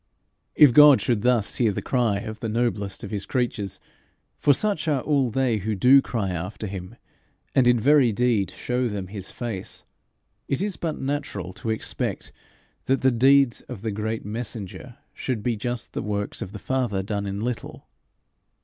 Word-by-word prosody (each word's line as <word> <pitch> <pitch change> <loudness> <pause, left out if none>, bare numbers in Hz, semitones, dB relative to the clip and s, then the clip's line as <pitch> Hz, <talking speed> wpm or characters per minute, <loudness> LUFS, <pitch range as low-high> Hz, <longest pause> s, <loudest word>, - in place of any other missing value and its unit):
If 145 -5 +7
God 150 -1 +8
should 115 -4 0
thus 120 -3 +1
hear 115 -4 +3
the - - -3
cry 120 -6 +1
of 110 +1 -7
the 115 - -3
noblest 105 -4 -2
of 100 - -6
his 100 -2 -4
creatures, 120 -6 -2 0.6
for 145 - +4
such 180 +2 0
are 145 -4 +1
all 140 -4 +1
they 125 -1 +1
who 105 +2 -2
do 130 +7 +6
cry 110 -8 -2
after 90 +5 -5
him, 95 +1 -7 0.6
and 130 -2 +4
in 120 -1 +5
very 135 0 +5
deed 110 -4 +1
show 125 +5 -2
them 100 -4 -5
his 100 -2 -7
face, 115 -6 -6 0.6
it 135 - -1
is 200 -1 -1
but 160 -3 -3
natural 135 - -3
to 105 +3 -6
expect 110 - -3 0.5
that 135 +1 +1
the 130 - +4
deeds 135 +1 +4
of 115 -5 -7
the 110 - -1
great 110 +1 -3
messenger 105 -2 -6 0.2
should 120 -5 -3
be 120 -2 0
just 120 +2 -4
the - - -2
works 105 -1 -3
of 95 - -5
the 105 - -7
Father 120 -5 -1
done 100 0 -3
in 100 0 -4
little. 120 +1 -5
115 Hz, 175 wpm, -24 LUFS, 100-130 Hz, 0.6 s, God